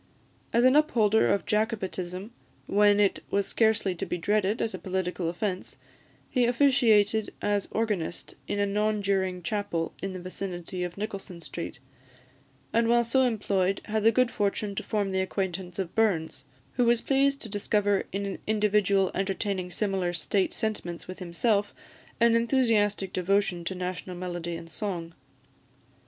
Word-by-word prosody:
As 235 +2 +4
an 255 +2 +6
upholder 220 -8 +4
of 200 - 0
Jacobitism, 205 -3 -2 0.3
when 205 0 +4
it 200 -2 +3
was 200 0 +1
scarcely 220 -4 +2
to 175 - -4
be - - -2
dreaded 205 +4 +1
as 225 - -1
a - - -5
political 185 -2 -2
offence, 185 +1 -3 0.5
he 250 -2 +2
officiated 225 -5 +3
as 205 -1 0
organist 210 -7 -2
in - - -2
a 205 - +2
non 210 +1 0
juring 190 -2 0
chapel 185 -3 -2
in 195 -1 -3
the 185 - -5
vicinity 180 -1 -5
of 175 +1 -5
Nicolson 195 -4 -6
Street; 170 -2 -6 1.0
and 230 0 +3
while 235 0 +4
so 235 +3 +2
employed 200 -6 +1
had 215 0 -1
the 225 - +6
good 255 +1 +2
fortune 205 0 -1
to - - -3
form 205 -2 -1
the 190 0 +1
acquaintance 190 -2 -3
of 185 -3 -3
Burns, 165 -11 0 0.3
who 245 - +4
was 235 0 +4
pleased 275 0 +2
to - - -6
discover 205 -1 +1
in 200 +1 -2
an 195 - -4
individual 210 -3 +2
entertaining 195 -1 -2
similar 190 -2 -1
state 190 +2 0
sentiments 195 -6 -3
with 185 - -8
himself, 200 +4 0 0.4
an 235 0 +5
enthusiastic 225 -5 +2
devotion 185 -1 +1
to 190 - -2
national 180 0 -4
melody 175 -1 -4
and 165 - -8
song. 170 -1 -4
200 Hz, 155 wpm, -28 LUFS, 185-220 Hz, 1.0 s, an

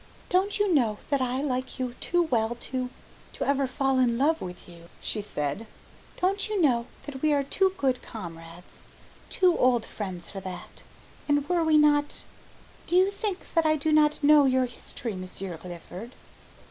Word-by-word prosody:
"Don't 385 +3 +2
you 410 -3 +2
know 230 -8 +2
that 280 -2 +2
I 255 +2 -1
like 255 -2 -2
you 255 -2 -3
too 350 0 +2
well 235 -6 0
to 255 0 -3 0.4
to - - -3
ever 275 -1 +2
fall 270 0 +1
in 240 -2 +3
love 310 +5 +2
with 180 -1 -8
you?" 170 -1 -14
she 215 - -3
said. 150 +1 -3 0.5
"Don't 395 +3 +1
you 420 -2 0
know 245 -7 +3 0.2
that 270 -3 -7
we 305 -1 +3
are 285 -1 +2
too 380 +7 +1
good 260 -2 +1
comrades, 170 -3 -10 0.5
too 360 -2 +3
old 245 -2 +3
friends 185 -5 -6
for 195 - -6
that? 185 -1 -8 0.5
And 290 -1 +2
were 345 -1 +2
we 315 -1 +4
not, 295 -1 +3 0.6
do 350 - 0
you 375 +2 +5
think 400 -2 -4
that 330 -2 +3
I 310 - +4
do 310 +1 -1
not 300 -1 +3
know 295 0 +7
your 260 -1 +3
history, 240 -1 -5
Monsieur 185 -1 -6
Clifford?" 180 +6 -9
265 Hz, 175 wpm, -27 LUFS, 220-310 Hz, 0.6 s, know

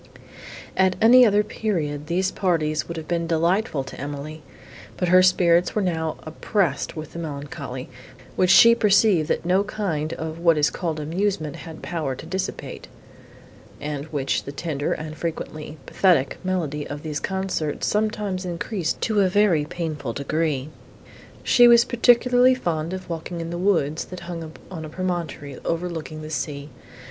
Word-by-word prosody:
At 190 -1 +3
any 245 +2 +7
other 210 0 +3
period, 155 -10 -3
these 185 +3 0
parties 155 -6 0
would 170 - -6
have 160 - -6
been 170 -1 -1
delightful 170 -1 +1
to 130 - -9
Emily; 145 +2 -6 0.6
but 180 - 0
her 185 +1 +7
spirits 180 -1 +3
were 210 - +2
now 160 -3 -1
oppressed 160 -1 -1
with 155 0 -8
a - - -4
melancholy, 140 -4 -6 0.5
which 185 - +2
she 230 +5 +8
perceived 200 -7 +3
that - - -1
no 185 +3 +3
kind 165 -7 -3
of 160 0 -5
what 170 -2 +4
is 150 0 +3
called 165 -4 -3
amusement 160 -1 -2
had 160 -2 -10
power 155 -6 -3
to 130 - -10
dissipate, 190 +3 -5 0.9
and 145 -1 -4
which 140 -4 -1
the 140 - -5
tender 145 0 -3
and, 155 0 -4
frequently, 155 -2 -5
pathetic, 170 -8 +2
melody 160 -6 -2
of 145 0 -7
these 155 -2 -3
concerts 190 -5 -2
sometimes 210 -3 -1
increased 175 0 -3
to 215 -3 +2
a 190 - +3
very 180 -6 +3
painful 150 -7 -4
degree. 145 0 -1 0.7
She 245 -1 +6
was 235 0 +7
particularly 245 +1 +4
fond 165 -8 -2
of 185 0 -6
walking 170 +1 -5
in 165 0 -5
the 175 - -3
woods, 165 -5 +1
that 180 - -9
hung 170 -2 -6 0.2
on 165 -4 -6
a 155 - -7
promontory, 165 -6 -4
overlooking 165 -2 -4
the 155 - -7
sea. 145 -1 -4
165 Hz, 155 wpm, -23 LUFS, 155-190 Hz, 0.9 s, she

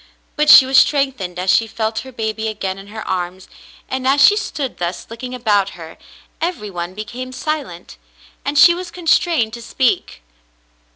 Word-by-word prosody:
But 300 0 +1
she 265 - +10
was 265 0 +5
strengthened 265 -11 0
as 185 +1 +1
she 225 - +3
felt 220 0 -3
her 260 - -9
baby 220 -2 -3
again 195 -3 -4
in 195 - -12
her 220 +1 -8
arms, 180 0 -4 0.4
and 260 0 -3
as 275 +2 +3
she 410 - +7
stood 290 -10 -4
thus 175 0 -4
looking 250 +2 -7
about 205 -6 0
her, 165 -1 -11 0.4
every 325 - -3
one 175 0 -6
became 235 +5 -7
silent, 255 - -5 0.5
and 285 +2 -2
she 345 +4 +8
was 355 0 -6
constrained 330 -8 +1
to 235 - -7
speak. 235 - -1
230 Hz, 170 wpm, -18 LUFS, 195-275 Hz, 0.5 s, she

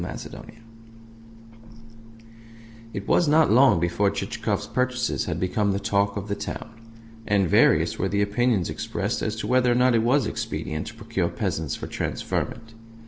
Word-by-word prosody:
CHAPTER - - -6 0.2
VIII 115 0 -16 2.3
It 100 -2 -6
was 175 - +3
not 155 -2 +4
long 130 -5 +6
before 85 +4 +1
Chichikov's - - -3
purchases 125 -1 -1
had 85 -2 -3
become 100 +2 0
the 100 - -1
talk 100 0 0
of 100 0 -5
the 100 - -2
town; 100 - -6 0.6
and 100 -2 +2
various - - +3
were - - 0
the 100 0 +1
opinions 105 -2 +1
expressed - - -3
as 110 - -2
to 110 - -5
whether 125 -1 +3
or - - +2
not 125 0 +4
it 115 - +3
was 125 +3 +2
expedient 75 -6 -4
to 110 - -8
procure 110 -6 -2
peasants 80 -4 -2
for - - -6
transferment. 115 -1 -4
110 Hz, 160 wpm, -24 LUFS, 100-120 Hz, 2.3 s, long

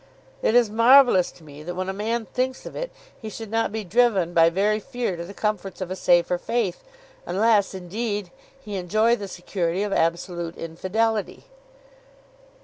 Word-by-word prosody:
"It 225 - +2
is 245 -2 +6
marvellous 230 -2 +6
to 165 - -18
me 145 -1 -12
that, 175 +3 -6
when 185 +1 -3
a 190 - -2
man 225 +3 -2
thinks 255 +2 -3
of - - -8
it, - - -4 0.3
he 220 - -6
should 220 0 -8
not 225 -2 0
be 220 0 -3
driven 200 -4 +2
by 165 -1 +6
very 205 +5 +1
fear 245 -4 -3
to 170 - -6
the 185 +4 -9
comforts 200 -3 -2
of 185 -1 -5
a - - -2
safer 175 -1 +2
faith, 215 -4 -2 0.4
unless, 205 0 +2
indeed, 205 +1 -4 0.3
he 210 -6 -6
enjoy 215 +6 +2
the 205 -4 -6
security 180 0 -2
of 205 -1 -2
absolute 170 0 -1
infidelity." 200 +6 -2
200 Hz, 170 wpm, -24 LUFS, 175-225 Hz, 0.4 s, is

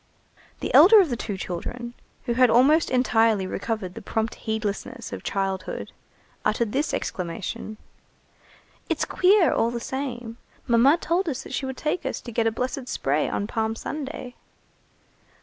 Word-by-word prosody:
The - - -3
elder 425 +4 +9
of 355 -8 +3
the - - +1
two 205 -3 -4
children, 235 +7 -5 0.3
who 240 - 0
had 250 0 +5
almost 280 +8 +5
entirely 225 -5 +3
recovered 195 -1 -3
the - - -8
prompt 220 0 -2
heedlessness 220 +3 -4
of - - -5
childhood, 195 -1 -3 0.5
uttered 215 0 0
this 285 +5 0
exclamation:— 185 +4 -4 1.1
"It's - - 0
queer, 375 -1 +4
all 230 - +2
the 240 0 -3
same. 240 -3 -5 0.3
Mamma 250 +6 +5
told 345 +2 0
us 265 -2 -4
that - - -9
she 265 - -2
would 265 - -5
take 310 +3 -1
us 265 - -3
to 240 - -8
get 225 0 +1
a - - +2
blessed 250 +3 -3
spray 145 - 0
on 200 - -2
Palm 220 0 -1
Sunday." 270 -1 -6
235 Hz, 155 wpm, -25 LUFS, 220-265 Hz, 1.1 s, elder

